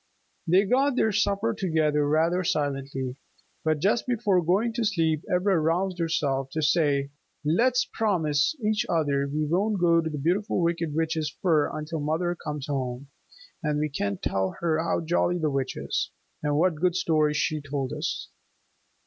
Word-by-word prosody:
They 185 +4 +4
got 265 +5 +2
their 220 -3 +2
supper 210 +1 +1
together 155 -7 +1
rather 165 +4 +2
silently. 135 -4 -2 0.5
But 155 -1 +1
just 215 +7 +1
before 210 -7 +2
going 200 +8 +1
to 235 0 -1
sleep 165 -7 +1
Ivra 180 0 +2
roused 175 +4 0
herself 140 -5 0
to 155 - -1
say, 145 -3 +2 0.3
"Let's 245 +11 +3
promise 160 - +1
each 215 0 +2
other 145 -4 +1
we 155 +1 0
won't 195 +6 0
go 170 -1 +4
to 160 - -3
the 150 - -5
Beautiful 180 +10 0
Wicked 170 -2 -1
Witch's 160 -1 0
fir 160 -5 +3
until 155 +1 -4
mother 160 +4 0
comes 150 -4 -5
home, 135 -1 -3 0.5
and 150 -2 0
we 150 +1 0
can 100 -8 -2
tell 95 +1 -1
her 160 -2 +1
how 170 - 0
jolly 175 +2 +1
the 155 -3 0
Witch 135 -1 -2
is, - - -2 0.3
and 145 0 0
what 165 -1 +1
good 180 -1 +2
stories 155 -4 +2
she 155 0 0
told 140 -2 -3
us." - - -3
160 Hz, 165 wpm, -26 LUFS, 150-185 Hz, 0.5 s, They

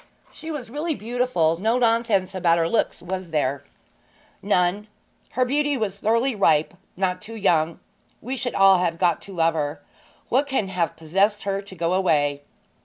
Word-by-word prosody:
'She 320 - -10
was 270 -7 -6
really 305 +3 -2
beautiful; 220 -9 0
no 225 +4 +2
nonsense 230 -6 +1
about 175 -3 +2
her 165 -1 +1
looks, 225 - -1
was 185 0 -5
there?' 140 -3 -1 0.8
'None. 195 +1 +1 0.5
Her 255 - +2
beauty 290 +2 0
was 200 -4 -3
thoroughly 230 +5 +1
ripe 160 -7 +2 0.2
not 185 -1 -1
too 225 +2 -8
young. 165 -6 +1 0.4
We 255 +3 -5
should 245 -1 -3
all 195 -1 +6
have 170 -2 0
got 170 -2 +1
to 200 - -11
love 165 -1 +2
her. 145 -2 -3 0.5
What 275 +4 +1
can 260 -8 -1
have 175 -4 -1
possessed 195 +6 +1
her 195 0 -2
to 195 -1 -13
go 170 0 -1
away?' 145 -6 +1
195 Hz, 170 wpm, -23 LUFS, 170-230 Hz, 0.8 s, all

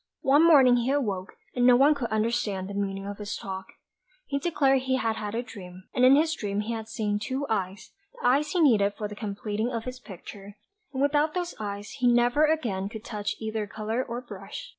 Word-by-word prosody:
One 285 +4 +5
morning 270 -7 +7
he 240 +1 0
awoke, 205 -10 -1 0.2
and 245 - +1
no 250 - +8
one 280 +4 +6
could 265 -5 -4
understand 215 -3 -1
the 200 - -7
meaning 195 -1 -3
of 205 +1 -6
his 210 0 -4
talk; 190 -1 -6 0.6
he 280 - -2
declared 275 -4 +2
he 260 0 0
had 225 -4 0
had 210 0 -4
a 240 - -1
dream, 185 -6 -11
and 250 - +1
in 260 +2 +8
his 315 +2 +3
dream 205 -7 -2
he 225 +2 -3
had 220 -1 -5
seen 210 -2 -1
two 260 +6 -3
eyes, 195 -2 -3 0.3
the - - -6
eyes 285 +4 +3
he 360 - 0
needed 205 -9 +4
for 210 - -4
the 205 - -8
completing 210 +2 -3
of 230 -2 -3
his 255 +1 -7
picture; 200 -1 -11 0.3
and 265 0 -1
without 295 +2 +2
those 355 -1 -2
eyes 205 -1 -5
he 250 - +3
never 240 +5 +4
again 230 -12 -1
could 220 0 -9
touch 210 -2 -3
either 220 -1 -3
colour 220 +4 -2
or 240 0 -5
brush. 210 - -9
225 Hz, 215 wpm, -27 LUFS, 205-265 Hz, 0.6 s, no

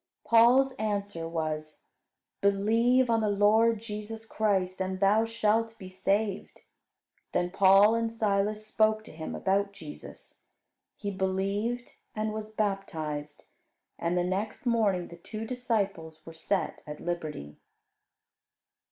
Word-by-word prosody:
Paul's 245 +4 +5
answer 200 -6 -2
was, 155 -2 -4 0.6
"Believe 225 +6 +3
on 230 -1 +2
the 215 - +1
Lord 215 +2 +4
Jesus 220 0 -6
Christ 190 -4 0
and 190 0 -2
thou 205 +3 +4
shalt 225 0 0
be 185 - -9
saved." 195 +2 -1 0.7
Then 180 0 0
Paul 195 +2 +6
and 230 0 0
Silas 215 -1 0
spoke 215 0 +2
to - - -12
him 160 0 -6
about 200 +1 0
Jesus. 155 -6 -11 0.6
He 205 -1 -4
believed, 195 +5 -1 0.2
and 215 0 -2
was 215 0 -5
baptized; 160 -9 -3 0.5
and 170 +1 0
the 175 - +2
next 195 +6 -3
morning 210 -7 +1
the 170 - -11
two 215 +5 -6
disciples 200 -10 -2
were 165 - -9
set 185 +4 -2
at 150 0 -7
liberty. 155 - -5
200 Hz, 125 wpm, -29 LUFS, 185-220 Hz, 0.7 s, Paul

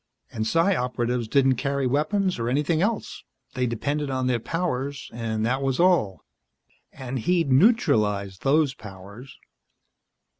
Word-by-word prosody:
And 110 -1 -3
Psi 165 - +2
Operatives 125 -2 -2
didn't 135 +1 +3
carry 140 +1 -1
weapons 155 - 0
or 115 +1 -1
anything 150 +5 +1
else. 215 +2 -2 0.3
They 125 -1 -1
depended 145 +5 -2
on 130 -1 -1
their 125 -2 +1
powers, 140 -2 -3
and 110 -2 -2
that 130 +3 0
was 135 -1 -1
all. 150 - +2 0.7
And 130 0 -5
he'd 165 +3 +1
neutralized 110 - +2
those 145 0 +2
powers. 105 +3 -12
130 Hz, 135 wpm, -24 LUFS, 115-150 Hz, 0.7 s, didn't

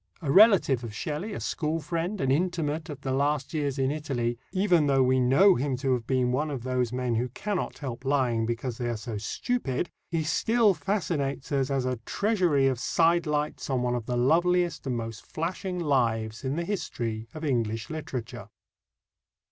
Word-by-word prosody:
A 140 - 0
relative 190 - +6
of 110 -3 -6
Shelley, 155 - -3
a - - -4
school 155 +1 -2
friend, 170 +5 -3
an 135 -1 +1
intimate 165 0 0
of 145 - -7
the 135 - -3
last 140 +1 0
years 145 -3 -1
in 135 0 +1
Italy, 125 -6 -2
even 180 -5 +3
though 135 -1 +4
we 130 +1 +3
know 135 +11 +6
him 135 -2 -1
to 135 0 +1
have 120 -2 -2
been 130 -2 +1
one 150 +5 0
of 135 -5 -4
those 125 -2 0
men 125 -1 -1
who 120 +3 0
cannot 200 - -3
help 125 -3 -6
lying 125 -5 +1
because 120 0 -3
they 120 -1 -1
are 120 - -2
so 110 0 -5
stupid, 165 - -2 0.2
he 165 -1 0
still 220 +6 +3
fascinates 150 -5 -2
us 135 -1 +1
as 135 -2 0
a 130 -1 -1
treasury 175 - +1
of 130 -3 +1
sidelights 160 -2 +1
on 130 -2 0
one 125 0 0
of 120 -2 -3
the 125 - -1
loveliest 175 +5 +2
and 125 -2 -1
most 115 -1 -6
flashing 180 +3 -4
lives 115 -8 0
in 135 +1 -1
the 170 +1 -2
history 115 - -3
of 155 0 -5
English 115 -3 -1
literature. 150 -7 -6
140 Hz, 185 wpm, -27 LUFS, 125-165 Hz, 0.2 s, relative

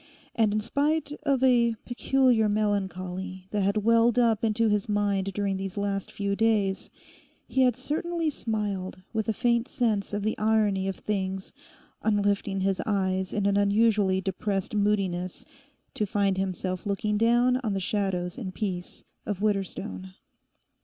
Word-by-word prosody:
And 220 -2 +2
in 215 +1 0
spite 290 +5 0
of 275 -3 +1
a 235 -3 +4
peculiar 245 -3 +2
melancholy 190 -3 -2
that 210 - 0
had 200 +2 +1
welled 230 +1 +4
up 230 -3 +3
into 225 +1 +2
his 210 -1 0
mind 200 -2 0
during 200 -1 -1
these 195 0 -5
last 200 -1 -2
few 200 -1 -2
days, 210 -3 +1 0.6
he 265 - +1
had 250 -3 +4
certainly 320 +5 -2
smiled 205 -7 -3
with 220 -1 -1
a - - +4
faint 235 +2 +1
sense 215 -5 0
of 205 0 -2
the 215 - 0
irony 210 -3 +2
of 195 - -2
things 190 -2 -3 0.5
on 210 -2 +2
lifting 200 -1 0
his 190 -1 +1
eyes 190 -2 0
in 205 -1 -1
an 200 0 +3
unusually 205 -2 +3
depressed 195 +1 -2
moodiness 195 -4 0 0.5
to 210 - -1
find 200 -1 +1
himself 185 0 -3
looking 210 +1 0
down 240 +3 +3
on 230 -6 -2
the - - 0
shadows 185 -2 -2
and 190 -6 -6
peace 185 -5 -4 0.2
of 205 -3 -2
Widderstone. 185 - -2
205 Hz, 155 wpm, -27 LUFS, 195-225 Hz, 0.6 s, a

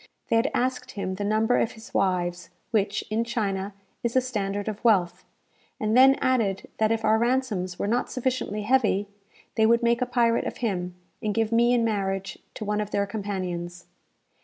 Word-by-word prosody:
They - - +3
had 230 +4 +3
asked 255 +1 -1
him 195 -2 -3
the 195 +2 -4
number 220 +3 +2
of - - 0
his 220 +1 -13
wives, 180 -2 0 0.2
which, 205 -2 +1
in 220 +2 +1
China, 200 -4 -2 0.3
is 235 0 -2
a - - +7
standard 205 -5 -3
of 215 +1 -5
wealth; 180 -6 +2 0.6
and 215 +1 0
then 265 +2 +7
added 225 -9 0
that 220 0 +3
if 225 -1 0
our 220 +1 +4
ransoms 230 -7 0
were - - -2
not 235 +4 0
sufficiently 250 -5 -2
heavy, 210 -4 +2 0.5
they 220 -1 +3
would 235 +1 +3
make 235 +1 +2
a 250 - +1
pirate 235 -2 +2
of - - -5
him, 180 -6 -2 0.3
and 210 -1 -1
give 225 -1 +1
me 235 +1 +4
in 240 -2 +3
marriage 195 -3 -2 0.2
to 215 - -5
one 210 +1 0
of 210 - -4
their 200 -1 0
companions. 185 -4 -4
215 Hz, 185 wpm, -26 LUFS, 195-235 Hz, 0.6 s, a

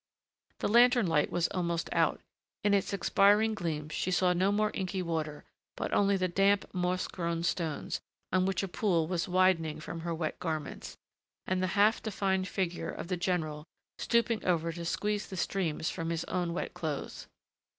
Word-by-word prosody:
The - - +1
lantern 240 +1 +5
light 150 -4 +2
was 170 -1 +1
almost 170 -2 -1
out. - - +2 0.4
In 205 - +3
its 200 -1 +1
expiring 205 +3 +4
gleams 155 -6 -3
she - - -1
saw 180 0 +3
no 185 +3 +2
more 210 +1 +1
inky 185 0 -2
water, 155 -3 -3 0.3
but - - -3
only 200 -1 +3
the 185 -1 +1
damp, 195 +2 +3
moss 180 0 0
grown 170 -2 -3
stones, 165 -3 -2 0.3
on 185 +1 +2
which 195 0 0
a - - -1
pool 175 -3 +1
was 170 0 -1
widening 180 -4 +2
from 165 +2 -6
her 170 0 -3
wet 160 -1 -3
garments, 155 -4 -4 0.5
and 185 0 0
the 185 - +1
half 210 +3 +4
defined 190 -3 0
figure 180 -3 -2
of - - -6
the 180 - +1
general 165 -4 -2 0.3
stooping 235 -1 +1
over 170 -2 +1
to 170 0 -6
squeeze 210 +4 -1
the 190 - -7
streams 170 -4 -1
from 165 -2 -4
his 170 0 -1
own 175 -2 -2
wet 170 - -3
clothes. 155 -4 -5
180 Hz, 175 wpm, -31 LUFS, 165-195 Hz, 0.5 s, lantern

